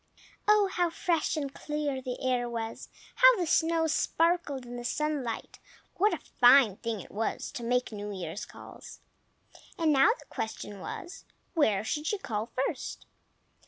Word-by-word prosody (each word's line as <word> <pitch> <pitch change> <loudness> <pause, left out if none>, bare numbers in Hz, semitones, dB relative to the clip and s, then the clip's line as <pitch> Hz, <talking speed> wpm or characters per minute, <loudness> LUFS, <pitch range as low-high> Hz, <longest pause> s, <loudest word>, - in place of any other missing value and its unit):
Oh, 420 -1 +5
how 350 -1 +2
fresh 330 -1 0
and 280 -2 -3
clear 295 -3 -3
the 250 -1 -5
air 245 -1 +1
was! 230 -1 -5 0.3
How - - +8
the 360 - 0
snow 325 0 +2
sparkled 320 -3 +1
in 240 0 -8
the 240 - -6
sunlight! 280 -3 -2 0.3
What 415 +4 +3
a - - -1 0.2
fine 245 -5 +7
thing 230 -4 -3
it - - -13
was 220 +2 -2
to 240 - -6
make 250 +1 0
New 205 -1 -5
Year's 185 -1 -5
calls! - - -11 0.8
And 320 -3 +3
now 270 0 +6
the - - -16
question 210 -2 -5
was, 350 - -7 0.3
where 220 - +2
she 295 +7 -2
should 395 +5 -2
call 215 -1 -2
first. 255 +3 -3
270 Hz, 160 wpm, -29 LUFS, 230-325 Hz, 0.8 s, How